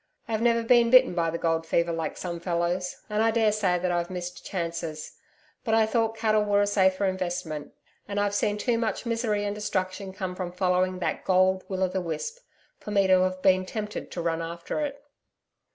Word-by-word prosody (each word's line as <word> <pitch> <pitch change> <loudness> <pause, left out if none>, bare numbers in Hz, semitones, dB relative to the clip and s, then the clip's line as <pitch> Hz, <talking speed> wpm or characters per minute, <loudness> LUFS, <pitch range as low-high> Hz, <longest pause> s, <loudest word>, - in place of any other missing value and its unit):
I've 220 -1 -1
never 230 -1 +3
been 235 0 +5
bitten 255 -3 +6
by 170 -1 +1
the 165 - -2
gold 165 -1 0
fever 170 +1 +1
like 165 -1 -3
some 170 -2 -4
fellows, 175 +1 -2
and 210 0 0
I 225 - +4
daresay 215 -5 +2
that 180 0 -1
I've 175 0 -1
missed 180 -1 -6
chances. 165 -4 -5 0.4
But 225 -3 +1
I 225 -1 +5
thought 225 0 0
cattle 215 -1 +2
were 205 -1 +2
a 205 - +4
safer 195 -1 +2
investment, 175 -5 -3 0.3
and 205 0 -2
I've 205 0 +1
seen 205 0 +1
too 230 +2 0
much 230 +1 -2
misery 225 -3 0
and 205 - -1
destruction 190 -2 -3
come 185 -1 -5
from 180 -1 -5
following 185 0 +1
that - - -2
gold 185 0 +3
will 190 -1 -1
o' - - +3
the 185 +1 -2
wisp, 170 - -4 0.4
for - - -9
me 200 -2 +3
to 185 -1 +5
have 185 0 -1
been 185 -1 +4
tempted 210 +2 -5
to 175 - -5
run 165 -1 0
after 170 - -4
it. 285 -2 -4
190 Hz, 200 wpm, -27 LUFS, 175-215 Hz, 0.4 s, bitten